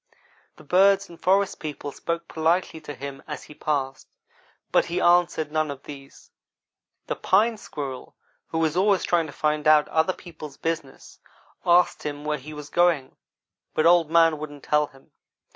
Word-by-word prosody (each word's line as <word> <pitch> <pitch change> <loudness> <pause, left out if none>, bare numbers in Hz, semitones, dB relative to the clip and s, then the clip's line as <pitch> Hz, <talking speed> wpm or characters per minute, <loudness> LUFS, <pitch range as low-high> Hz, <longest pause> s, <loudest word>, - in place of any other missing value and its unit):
The - - -16
birds 195 +2 +4
and 170 - -14
forest 195 +1 +2
people 145 -2 -6
spoke 170 +3 -4
politely 160 0 0
to 145 -2 -8
him 140 -1 -7
as - - -6
he - - -13
passed 135 -3 -3 0.6
but - - +4
he 175 +1 -2
answered 175 -4 +3
none 155 -1 0
of 140 -1 -7
them. 135 -2 -10 1.0
The - - -3
Pine 220 +5 +2
squirrel, 140 -10 -7 0.3
who 160 0 0
is 155 0 -1
always 195 0 +3
trying 170 -2 +1
to - - -9
find 150 +1 -1
out 155 -1 +6
other 160 +4 +2
people's 155 -6 -11
business, 165 -5 -5 0.5
asked 175 +1 +4
him 145 0 -5
where 150 -1 -1
he 150 +4 -10
was 150 -1 -9
going, 175 -6 +2 0.6
but 155 - +2
Old 170 -2 +5
man 165 -2 +4
wouldn't 145 -2 -8
tell 150 0 +2
him. 135 -2 -22
155 Hz, 165 wpm, -25 LUFS, 145-175 Hz, 1.0 s, out